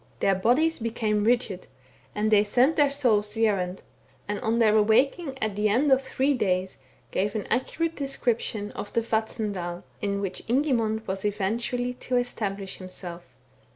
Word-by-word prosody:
Their 195 - +3
bodies 250 - +2
became 220 -2 0
rigid, 230 -6 0 0.5
and 215 +1 0
they 205 -1 +6
sent 250 +9 +3
their 290 -2 +4
souls 225 -7 +1
the 225 0 +3
errand, 185 -3 -1 0.4
and, 205 0 -2
on 225 +1 0
their 220 -2 +4
awaking 265 - +2
at 215 -2 -1
the 210 +1 +1
end 265 +7 +3
of 265 0 +5
three 270 +1 0
days, 190 - -1 0.3
gave 200 +2 -1
an 215 - -2
accurate 330 +7 -1
description 235 -6 -1
of 205 - -7
the 230 - +2
Vatnsdal, 210 -6 -2 0.2
in 200 -1 -1
which. 190 -2 -4
Ingimund 230 -4 +1
was 190 0 -3
eventually 230 +5 -1
to 250 0 -2
establish 200 -5 -3
himself. 180 -2 -8
220 Hz, 155 wpm, -26 LUFS, 200-250 Hz, 0.5 s, they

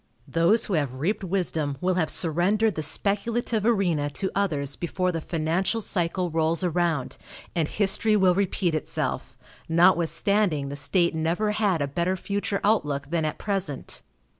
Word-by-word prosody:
Those 170 +8 +2
who 200 - -3
have 145 -6 0
reaped 175 +11 -1
wisdom 165 -6 -1
will 185 +3 +1
have 175 -3 0
surrendered 195 +6 +2
the 155 - -3
speculative 215 +7 0
arena 175 -10 +1
to 190 +7 -3
others 150 -9 -1
before 180 +1 -1
the 165 -2 -3
financial 170 +7 -1
cycle 180 -3 -1
rolls 165 +2 +1
around, 170 -5 -1 0.4
and 165 -3 +1
history 210 +3 +2
will 190 -3 +4
repeat 185 -2 0
itself, 155 - -3 0.3
notwithstanding 170 -1 +2
the 140 - -5
state 170 +5 +1
never 170 +7 0
had 205 -7 +1
a - - -1
better 175 +6 -1
future 200 +1 -2
outlook 145 -9 0
than 165 -2 0
at 155 - -3
present. 190 -9 -3
175 Hz, 150 wpm, -25 LUFS, 155-200 Hz, 0.4 s, will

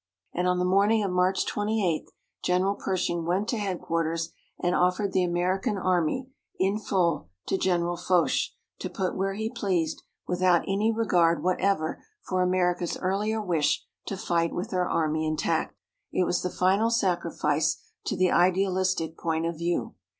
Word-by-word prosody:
And 180 +1 0
on 180 0 +2
the 180 - +1
morning 200 +4 +3
of 195 - -1
March 180 +1 +2
28 205 -6 -1 0.3
General 185 +2 +2
Pershing 175 -4 -1
went 185 +5 0
to 235 - 0
headquarters 165 -4 -2 0.3
and 175 0 +1
offered 180 +2 +1
the 185 - +3
American 185 +5 0
Army 185 +6 +1 0.3
in 195 +3 +1
full 175 - 0 0.2
to - - 0
General 175 -2 +1
Foch, 175 0 +2 0.3
to - - -4
put 190 -4 -2
where 195 +1 -1
he 220 +1 -2
pleased, 185 -9 -1 0.3
without 180 -1 +3
any 205 +3 +2
regard 175 -7 +2
whatever 185 -2 0 0.2
for 185 -1 -1
America's 180 -1 +1
earlier 205 +4 0
wish 165 -7 +1 0.2
to 195 - -3
fight 170 -2 0
with 190 +6 -3
her 180 -1 0
army 155 -1 +1
intact. 155 0 -1 0.3
It - - +2
was 175 - 0
the 180 - -1
final 195 +6 +2
sacrifice 170 -8 +1 0.3
to 200 - -2
the 185 0 +3
idealistic 185 -2 +2
point 165 -1 -1
of 170 0 -2
view. 170 +1 -1
180 Hz, 155 wpm, -27 LUFS, 170-195 Hz, 0.3 s, morning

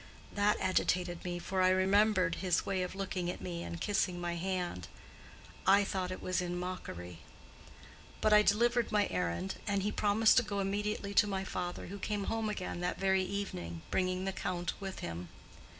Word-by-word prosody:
That 205 0 +3
agitated 180 -1 +1
me, 175 -1 -3
for 185 +2 -1
I 185 - +5
remembered 185 -1 +3
his 180 -2 +1
way 190 -2 0
of 180 +1 -3
looking 185 -2 -2
at - - -4
me 90 -2 -5
and 85 -1 -5
kissing 185 -3 0
my 175 0 -2
hand—I 185 - -2
thought 190 -2 -2
it 185 - -6
was 185 0 0
in 175 0 -3
mockery. 90 - -6 1.0
But 215 - +3
I 210 - +8
delivered 235 +3 +2
my 210 -2 +3
errand, 90 0 -2
and 200 -2 +1
he 210 - 0
promised 215 +3 +4
to 250 - +6
go 205 -2 -3
immediately 200 +1 -1
to 210 +1 +5
my 195 -1 -2
father, 180 -2 -4
who 200 +2 -7
came 205 0 -2
home 225 +1 -1
again 185 -4 -4
that 180 0 -2
very 190 0 +3
evening, 90 - -4
bringing 185 0 0
the 195 - -1
Count 180 -2 -2
with 195 -1 -6
him. 85 +1 -5
185 Hz, 180 wpm, -33 LUFS, 175-200 Hz, 1.0 s, I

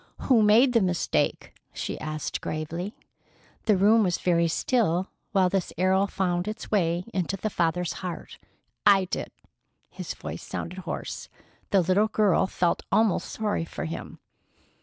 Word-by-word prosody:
"Who 245 -5 +4
made 225 +5 +5
the 230 - +4
mistake?" 180 -2 0 0.2
she - - -4
asked 155 -1 -4
gravely. 170 - -4 0.7
The 210 -3 +4
room 215 +4 +5
was 180 -4 +1
very 170 -2 +2
still 185 -1 +1 0.2
while 190 -3 +4
this 185 -1 -1
arrow 190 +2 +3
found 180 -1 -1
its 215 +1 -6
way 175 -4 +1
into 190 +1 -1
the 215 +3 -3
father's 170 0 0
heart. 180 -3 -6 0.4
"I 195 -2 +5
did." 180 - -4 0.6
His - - -6
voice - - -7
sounded 180 +2 -6
hoarse. - - -5 0.4
The 195 - +4
little 185 +5 +3
girl 210 -4 +2
felt 175 -2 0
almost 215 -1 +2
sorry 210 -5 -1
for 165 - -6
him. 165 - -6
185 Hz, 145 wpm, -26 LUFS, 175-210 Hz, 0.7 s, made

